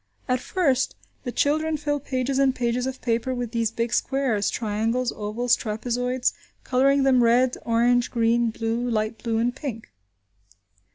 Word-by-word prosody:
At 255 -1 +1
first, 280 -3 0 0.3
the 245 - -2
children 310 +4 +1
fill 290 -1 -1
pages 265 0 -2
and 270 -1 +3
pages 245 +1 -1
of 265 0 -5
paper 240 +2 0
with 245 -2 -4
these 230 -2 0
big 230 +1 -2
squares, 255 -7 +1
triangles, 225 +3 -1
ovals, 230 +4 0
trapezoids; 245 +3 -1 0.3
colouring 275 +2 +3
them 260 -2 +4
red, 245 +2 +3
orange, 240 +1 +3
green, 235 0 +2
blue, 225 +2 -2
light 215 -1 -2
blue, 230 -2 -1
and 240 +2 0
pink. 255 -6 -6
245 Hz, 150 wpm, -24 LUFS, 230-260 Hz, 0.3 s, them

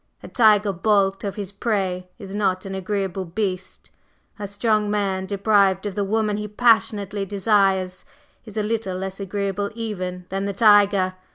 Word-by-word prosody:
A - - -8
tiger 210 -3 +4
balked 195 +1 +1
of 200 -2 -3
his 200 -2 -4
prey 190 -4 -2
is 195 -4 -9
not 195 -3 0
an 195 - -5
agreeable 190 -1 -2
beast; 185 +1 -4 0.5
a 205 - -4
strong 210 +1 0
man 195 -2 -1
deprived 200 -1 +2
of 205 - -3
the 205 +1 -1
woman 210 +1 0
he 210 0 -4
passionately 210 -2 +2
desires 195 -2 +1 0.4
is 220 -2 -11
a 215 - +1
little 210 -4 -2
less 190 +1 -5
agreeable 200 0 -2
even 185 -6 -5
than 195 +1 -2
the 200 - -2
tiger. 200 -2 +4
200 Hz, 160 wpm, -22 LUFS, 190-210 Hz, 0.5 s, tiger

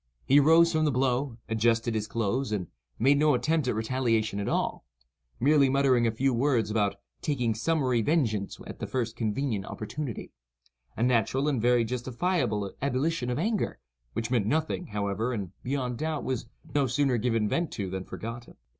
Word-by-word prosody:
He 140 +2 +6
arose 165 +3 +6
from 155 -1 +2
the 150 - +2
blow, 130 -1 0
adjusted 115 +1 +1
his 110 -1 -2
clothes, 115 +3 -1
and 100 -4 -1 0.3
made 140 +4 +4
no 150 -2 +4
attempt 150 +3 +1
at 125 - +1
retaliation 110 -2 0
at 100 - -2
all—merely 65 - 0
muttering 130 -3 +3
a - - +2
few 130 +4 +1
words 120 -4 +1
about 105 -2 +1 0.3
"taking 125 -6 0
summary 130 0 +1
vengeance 110 -8 0
at - - -9
the - - -4
first 115 -3 -2
convenient 110 -2 -2
opportunity,"—a 60 - -7
natural 125 +3 +2
and 135 -6 +1
very 120 0 +4
justifiable 125 - -1
ebullition 140 +1 0
of 125 - -1
anger, 210 +5 -1 0.4
which 115 +1 -3
meant 115 -5 +2
nothing, 160 +5 -1
however, 105 +3 -2
and, 100 -6 -4
beyond 125 -2 -2
doubt, 155 -1 -2
was 130 -1 -3 0.3
no 140 -2 +2
sooner 130 -1 +1
given 115 -2 +1
vent 170 +8 -1
to 100 -3 -3
than 95 0 -3
forgotten. 115 +4 -8
125 Hz, 165 wpm, -28 LUFS, 110-140 Hz, 0.4 s, He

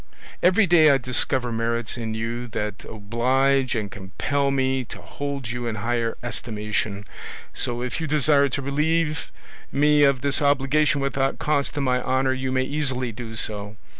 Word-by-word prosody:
"Every 190 +4 +5
day 165 -3 +6
I 140 - +5
discover 130 -1 0
merits 115 0 -1
in 110 -2 -4
you 115 +2 -3
that 105 -2 -4
oblige 130 +5 +1
and 105 -3 -3
compel 140 +9 -2
me 130 -1 +1
to - - -9
hold 140 -4 -5
you 120 0 -4
in 115 - -2
higher 115 +1 -1
estimation; 105 -3 -3 0.5
so 120 0 -3
if 125 +5 -3
you 160 - -2
desire 145 -1 +3
to 140 +2 -3
relieve 150 +2 0 0.4
me 150 +1 +4
of 140 -3 +4
this 140 +1 +1
obligation 145 +1 +2
without 135 0 0
cost 145 -1 0
to 145 - -1
my 125 -2 +1
honour, 130 +1 +1
you 130 0 -3
may 130 0 +1
easily 130 -3 -1
do 115 0 -8
so. 105 -1 -2
130 Hz, 165 wpm, -24 LUFS, 115-140 Hz, 0.5 s, day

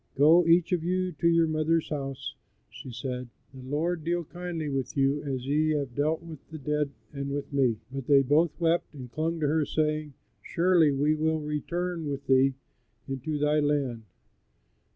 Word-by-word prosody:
"Go, 160 +5 +6
each 170 +1 +4
of 175 -3 +1
you, 185 +1 0
to 170 - +3
your 165 0 +4
mother's 155 +1 +1
house," 135 -3 -4 0.4
she 130 - -9
said; 125 +1 -5 0.2
"the 130 - -10
Lord 155 +5 -2
deal 170 +2 0
kindly 175 -1 -5
with 135 -1 -3
you 140 +1 +2
as 130 -3 -4
ye 155 +3 +2
have 140 -4 -4
dealt 155 +5 0
with 160 -3 -9
the 160 - -7
dead 150 0 -1 0.2
and 140 -1 -4
with 140 0 -4
me." 130 -5 +2
But 135 -2 -6
they 140 -2 +6
both 150 +6 +2
wept 170 -1 +1
and 125 -3 -9
clung 160 +4 -2
to 150 - +2
her, 155 +1 +2
saying, 150 -1 -1 0.3
"Surely 170 -3 +3
we 145 +2 +2
will 160 0 0
return 165 +2 -3
with 140 0 -4
thee 135 0 +4 0.5
into 135 +3 -3
thy 150 +1 +2
land." 145 -5 0
150 Hz, 175 wpm, -28 LUFS, 135-165 Hz, 0.5 s, Go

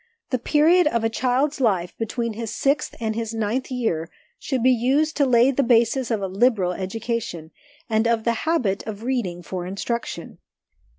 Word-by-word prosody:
The 255 - +1
period 315 +6 +4
of 235 -6 0
a 225 - +1
child's 265 +5 0
life 185 -7 +1
between 230 +1 -3
his 225 +1 -5
sixth 280 +2 0
and 220 -2 -1
his 225 0 -4
ninth 225 +4 -1
year 220 -11 -2 0.3
should 260 -5 -2
be 255 - +6
used 270 +6 +2
to 285 -2 +3
lay 245 +1 +5
the 275 - +1
basis 240 0 +2
of 220 -4 -1
a - - 0
liberal 195 -1 +2
education, 195 -4 -4 0.4
and 220 0 +1
of 230 -1 +1
the 235 - +2 0.2
habit 240 -13 +1
of 215 0 -6
reading 220 -9 -2
for 180 +2 -5
instruction. 200 -2 -4
230 Hz, 175 wpm, -23 LUFS, 210-255 Hz, 0.4 s, be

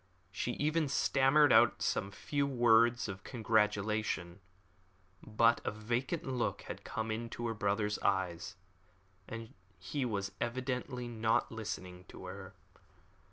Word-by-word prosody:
She 120 +5 -2
even 155 +3 +1
stammered 140 +2 +4
out 115 +1 +5
some 100 - 0
few 140 +7 -1
words 120 -2 +4
of 95 -1 -7
congratulation, 105 -5 0 0.8
but 115 +2 +3
a - - 0
vacant 120 - -2
look 130 -2 -2
had - - -7
come 110 0 -3
into 115 +1 -4
her 115 - -1
brother's 105 0 0
eyes, 95 -3 -1 0.7
and 115 0 -7 0.2
he 115 +10 -3
was 100 -5 -2
evidently 125 0 -2
not 110 -1 +1
listening 95 -5 -6
to - - -11
her. - - -8
115 Hz, 120 wpm, -33 LUFS, 105-125 Hz, 0.8 s, out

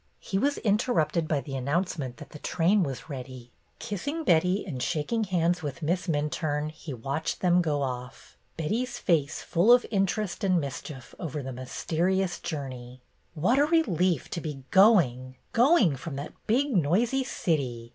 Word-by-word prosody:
He 195 - -2
was 285 +4 +1
interrupted 190 - +1
by 150 -3 0
the 135 +1 -6
announcement 140 -1 -2
that 150 -3 -11
the 150 - -10
train 180 +7 +2
was 135 -7 -3
ready. 130 -4 -8 0.3
Kissing 285 - -4
Betty 180 - +2
and 140 -10 -5
shaking 175 - -1
hands 175 -1 +1
with 150 +2 -5
Miss 175 +5 0
Minturne, 150 -1 -1
he 155 0 -9
watched 140 +6 -3
them 180 -1 +4
go 150 -4 0
off, 125 -1 -6 0.2
Betty's 235 +10 -2
face 160 -4 0
full 180 +8 +3
of 245 0 +6
interest 200 0 -1
and 185 -3 +3
mischief 135 -1 -7
over 150 -4 -4
the 130 0 -5
mysterious 175 +8 -1
journey. 130 -5 -6 0.4
"What 220 - +2
a 290 - +5
relief 185 - +1
to 170 - -3
be 150 -4 -6
going, 140 - +4 0.2
going 235 - +4
from 140 +2 -6
that 140 +3 -6
big, 260 +3 +2
noisy 215 - +2
city!" 130 - -2
165 Hz, 155 wpm, -27 LUFS, 140-195 Hz, 0.4 s, of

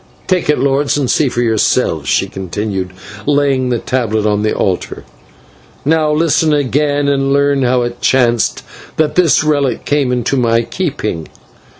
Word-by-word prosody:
"Take 180 -4 0
it, 150 - +3
lords, 140 +2 +1
and 135 -4 0
see 145 - +2
for 120 - -2
yourselves," 110 - 0
she - - +2
continued, 95 0 -4 0.4
laying 140 -3 +1
the 120 - +1
tablet 110 -3 -1
on 105 -1 +1
the 110 - 0
altar. 95 -3 -2 0.8
"Now, 155 0 +2
listen 160 0 +2
again, 145 +1 0
and 135 -1 +1
learn 140 0 +2
how 125 -1 +2
it 120 0 -5
chanced 120 -3 +1 0.3
that 155 -1 +1
this 175 -4 +3
relic 145 -4 0
came 145 -3 +1
into 125 +2 0
my 115 -2 +2
keeping. 115 - -3
130 Hz, 155 wpm, -15 LUFS, 115-145 Hz, 0.8 s, it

